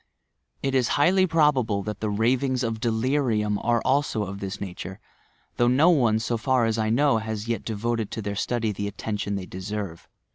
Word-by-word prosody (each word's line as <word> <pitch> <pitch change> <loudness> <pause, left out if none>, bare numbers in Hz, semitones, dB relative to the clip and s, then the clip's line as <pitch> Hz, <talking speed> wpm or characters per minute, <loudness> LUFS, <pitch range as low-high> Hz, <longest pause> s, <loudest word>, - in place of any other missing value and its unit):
It 135 - 0
is 130 -3 +3
highly 185 +5 +4
probable 140 - +2
that 105 +1 -5
the 110 - -2
rav 115 +6 +1
ings 130 -2 0
of 115 -1 -2
delirium 115 -3 0
are 120 0 +1
also 135 -5 +1
of 100 0 -6
this 100 +1 -5
nature, 95 -1 -7 0.6
though 120 - +3
no 140 +8 +5
one, 120 -9 +3
so 115 +1 -1
far 130 0 +2
as 115 0 0
I 110 0 +1
know, 130 0 +3
has 110 0 -5
yet 115 -4 -2
devoted 115 0 -2
to 110 - -5
their 100 0 -3
study 115 +1 -1
the 100 0 -3
at 100 - -8
tention 100 -2 -3
they 95 -2 -4
deservp. 95 -2 -5
110 Hz, 195 wpm, -25 LUFS, 105-130 Hz, 0.6 s, no